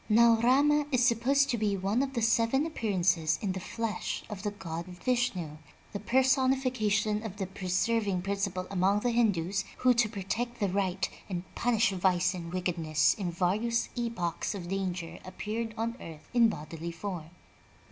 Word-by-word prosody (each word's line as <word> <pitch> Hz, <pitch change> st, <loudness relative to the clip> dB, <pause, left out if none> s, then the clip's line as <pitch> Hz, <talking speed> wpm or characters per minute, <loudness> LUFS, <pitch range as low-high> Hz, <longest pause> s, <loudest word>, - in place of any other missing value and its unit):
Now 230 Hz, +1 st, +6 dB
Rama 290 Hz, +4 st, +4 dB
is 250 Hz, -2 st, +3 dB
supposed 265 Hz, +4 st, +3 dB
to 235 Hz, -, -1 dB
be 205 Hz, -2 st, +1 dB
one 200 Hz, +6 st, 0 dB
of 270 Hz, -1 st, -2 dB
the 235 Hz, -3 st, -1 dB
seven 230 Hz, +5 st, +3 dB
appearances 180 Hz, -, +1 dB
in 200 Hz, -, -1 dB
the 190 Hz, -, -3 dB
flesh 220 Hz, +1 st, -3 dB
of 200 Hz, -2 st, -5 dB
the 205 Hz, -, -1 dB
god 170 Hz, -4 st, -6 dB
Vishnu, 180 Hz, -5 st, -1 dB, 0.4 s
the 200 Hz, -, -3 dB
personification 255 Hz, -4 st, +2 dB
of 210 Hz, -3 st, -7 dB
the 195 Hz, -, -2 dB
preserving 190 Hz, +1 st, 0 dB
principle 195 Hz, -2 st, -2 dB
among 195 Hz, +2 st, +2 dB
the 245 Hz, -, +1 dB
Hindus, 195 Hz, -5 st, +1 dB
who, 255 Hz, -1 st, +4 dB
to 235 Hz, -2 st, +2 dB
protect 230 Hz, +4 st, -3 dB
the 200 Hz, -3 st, +1 dB
right, 190 Hz, 0 st, 0 dB, 0.2 s
and 180 Hz, -2 st, -3 dB
punish 230 Hz, -3 st, +2 dB
vice 185 Hz, 0 st, +2 dB
and 170 Hz, -2 st, -6 dB
wickedness, 165 Hz, -4 st, +1 dB
in 190 Hz, -4 st, -3 dB
various 210 Hz, +7 st, 0 dB
epochs 230 Hz, -7 st, -2 dB
of 175 Hz, -3 st, -6 dB
danger 180 Hz, -3 st, -3 dB
appeared 220 Hz, +4 st, -4 dB
on 230 Hz, +1 st, -2 dB
earth 155 Hz, -2 st, -10 dB
in 235 Hz, -2 st, +5 dB
bodily 165 Hz, -2 st, -6 dB
form. 170 Hz, -2 st, -6 dB
205 Hz, 160 wpm, -30 LUFS, 180-235 Hz, 0.4 s, Now